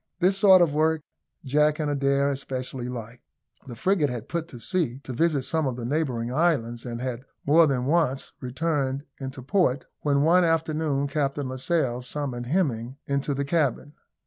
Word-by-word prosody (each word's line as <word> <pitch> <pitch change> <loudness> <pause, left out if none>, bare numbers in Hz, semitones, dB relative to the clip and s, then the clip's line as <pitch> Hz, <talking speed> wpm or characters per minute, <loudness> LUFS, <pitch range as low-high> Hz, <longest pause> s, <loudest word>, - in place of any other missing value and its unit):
This 185 +2 +3
sort 190 -2 +7
of 155 -4 0
work 155 0 +1 0.4
Jack 150 +3 +3
and 155 - -1
Adair 140 0 +2
especially 130 -2 -4
liked. 120 0 -7 0.5
The 120 - -7
frigate 165 - +1
had 120 0 -5
put 170 -1 -2
to 125 - -11
sea 140 -3 -1
to 130 - -6
visit 150 +1 +1
some 160 +1 0
of 130 - -2
the 120 -1 -5
neighbouring 125 -4 -1
islands, 130 -8 +1
and 120 -1 -5
had 125 -1 -3 0.2
more 160 +3 +6
than 130 -3 0
once 145 -3 +1
returned 135 0 -1 0.2
into 130 -1 -6
port; 140 -3 +1
when 140 -1 +2
one 175 +4 +5 0.2
forenoon 155 -3 -1
Captain 140 -1 -1
Lascelles 130 -2 -1
summoned 125 -4 -4
Hemming 130 -6 -1
into 140 0 -1
the 140 +1 -1
cabin. 145 -2 0
140 Hz, 170 wpm, -26 LUFS, 125-160 Hz, 0.5 s, sort